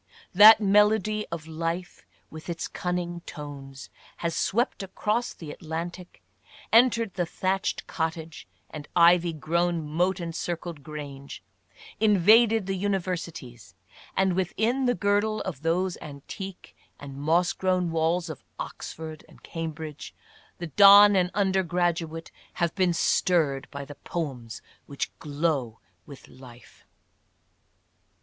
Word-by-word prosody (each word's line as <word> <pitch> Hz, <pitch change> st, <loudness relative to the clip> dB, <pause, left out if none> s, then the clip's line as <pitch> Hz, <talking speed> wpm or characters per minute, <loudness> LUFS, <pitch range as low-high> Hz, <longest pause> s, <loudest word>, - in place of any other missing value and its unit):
"That 210 Hz, +4 st, +9 dB
melody 210 Hz, +1 st, +2 dB
of 165 Hz, -2 st, -5 dB
life 165 Hz, +2 st, -5 dB, 0.2 s
with 160 Hz, +2 st, -10 dB
its 170 Hz, -1 st, -3 dB
cunning 175 Hz, -1 st, -3 dB
tones 140 Hz, -3 st, -9 dB
" -, -, -25 dB
has 170 Hz, -1 st, -1 dB
swept 235 Hz, +3 st, 0 dB
across 210 Hz, +5 st, -2 dB
the 155 Hz, -3 st, -9 dB
At -, -, -11 dB
lantic, 170 Hz, +2 st, -6 dB, 0.5 s
entered 230 Hz, -3 st, +4 dB
the 180 Hz, -2 st, -1 dB
thatched 190 Hz, +3 st, -2 dB
cottage 160 Hz, -1 st, -4 dB, 0.2 s
and 150 Hz, -2 st, -8 dB
ivy 175 Hz, 0 st, +5 dB
grown 165 Hz, +1 st, -1 dB
moat 180 Hz, +5 st, 0 dB
en 170 Hz, -1 st, -5 dB
circled 170 Hz, -2 st, -5 dB
grange 140 Hz, -2 st, -9 dB, 0.3 s
— -, -, -19 dB
invaded 220 Hz, +1 st, +5 dB
the 195 Hz, -, -2 dB
universities, 175 Hz, -, -4 dB, 0.4 s
and 190 Hz, -1 st, +3 dB
within 220 Hz, +8 st, 0 dB
the 245 Hz, -, +2 dB
girdle 205 Hz, +1 st, +1 dB
of 165 Hz, -8 st, -6 dB
those 175 Hz, +3 st, 0 dB
antique 175 Hz, +6 st, -9 dB, 0.2 s
and 140 Hz, -1 st, -9 dB
moss 170 Hz, +4 st, +2 dB
grown 185 Hz, -2 st, 0 dB
walls 165 Hz, +2 st, 0 dB
of 155 Hz, -5 st, -8 dB
Oxford 160 Hz, -1 st, -7 dB
and 155 Hz, -, -19 dB
Cambridge 160 Hz, -2 st, -7 dB, 0.4 s
the 175 Hz, -, -5 dB
don 200 Hz, +5 st, +8 dB
and 180 Hz, -1 st, +2 dB
the -, -, -11 dB
under 190 Hz, -1 st, +2 dB
graduate 170 Hz, -2 st, -2 dB, 0.2 s
have 170 Hz, -1 st, -1 dB
been 185 Hz, -3 st, +2 dB
stirred 155 Hz, -6 st, +1 dB
by 140 Hz, -1 st, -7 dB
the 145 Hz, -, -10 dB
poems 135 Hz, -8 st, -6 dB, 0.2 s
which 140 Hz, -, -4 dB
glow 145 Hz, -6 st, -2 dB, 0.3 s
with 140 Hz, -, -12 dB
life. 125 Hz, -2 st, -16 dB
170 Hz, 130 wpm, -26 LUFS, 155-190 Hz, 0.5 s, That